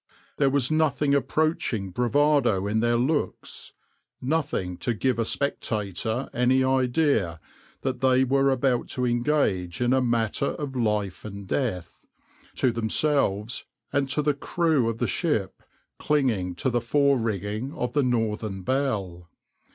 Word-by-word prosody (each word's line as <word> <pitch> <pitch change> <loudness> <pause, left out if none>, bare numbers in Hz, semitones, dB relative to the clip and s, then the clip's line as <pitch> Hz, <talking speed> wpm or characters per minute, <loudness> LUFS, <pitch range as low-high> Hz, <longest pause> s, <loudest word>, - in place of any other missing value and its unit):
There 140 -2 +3
was 135 0 +2
nothing 150 -2 +2
approaching 135 - 0
bravado 125 -2 +2
in 105 +2 0
their 120 +1 +2
looks, 145 +5 -2 0.5
nothing 135 - -1
to 120 - -2
give 125 +2 0
a 115 - +1
spectator 110 -2 -2
any 125 +2 +3
idea 130 - +1 0.4
that 130 -2 -2
they 130 0 +4
were 135 +1 +2
about 130 -2 +1
to 125 - +1
engage 120 - 0
in 125 +1 +2
a 130 - +3
matter 120 +1 0
of 140 -3 -5
life 105 -5 -1
or 110 - -6
death, 100 - -4 0.5
to 130 - +2
themselves 115 -1 0 0.3
and 140 -1 +1
the 150 +1 +1
crew 150 -4 +1
of 115 - -3
the - - 0
ship 115 - -1 0.4
clinging 115 -12 0
to 125 +9 -1
the 120 0 +1
fore 140 +3 +2
rigging 110 +3 -3
of 125 0 -3
the 145 - +3
{\itshape{Northern 110 -6 -1
Belle}}. 100 -11 -2
125 Hz, 135 wpm, -25 LUFS, 105-140 Hz, 0.5 s, they